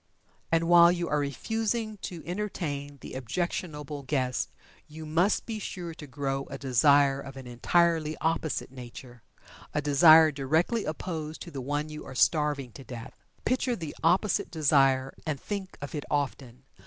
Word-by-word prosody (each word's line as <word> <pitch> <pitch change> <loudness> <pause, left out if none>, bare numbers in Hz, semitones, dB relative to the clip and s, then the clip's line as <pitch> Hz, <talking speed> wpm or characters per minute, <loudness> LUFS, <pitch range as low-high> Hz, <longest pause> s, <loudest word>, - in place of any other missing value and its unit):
And 165 0 +2
while 170 0 +8
you 175 -1 -2
are 150 - +1
refusing 220 - -2
to 175 -4 -7
entertain 160 -7 -4
the - - -9
objectionable 150 +1 -3
guest 130 -3 -1 0.4
you 155 +1 -9
must 170 +6 +1
be 220 -2 -4
sure 175 -4 -6
to 150 -2 -10
grow 135 0 -3
a 135 - -7
desire 140 +1 +4
of 135 -1 -9
an 135 - -9
entirely 155 +5 +1
opposite 160 -4 -1
nature 125 -1 -11 0.5
a - - +3
desire 155 +2 +7
directly 160 - 0
opposed 155 0 -4
to 170 - -10
the 135 -3 -5
one 145 +3 -2
you 150 0 -7
are 135 - -9
starving 145 -4 +2
to 135 - -11
death. 125 0 -8 0.3
Picture 255 0 +1
the 160 -7 -6
opposite 185 +4 +2
desire, 135 -4 +3
and 150 -3 -3
think 195 +1 -5
of 145 - -6
it 150 -2 -4
often. 135 -3 -3
150 Hz, 155 wpm, -28 LUFS, 135-170 Hz, 0.5 s, while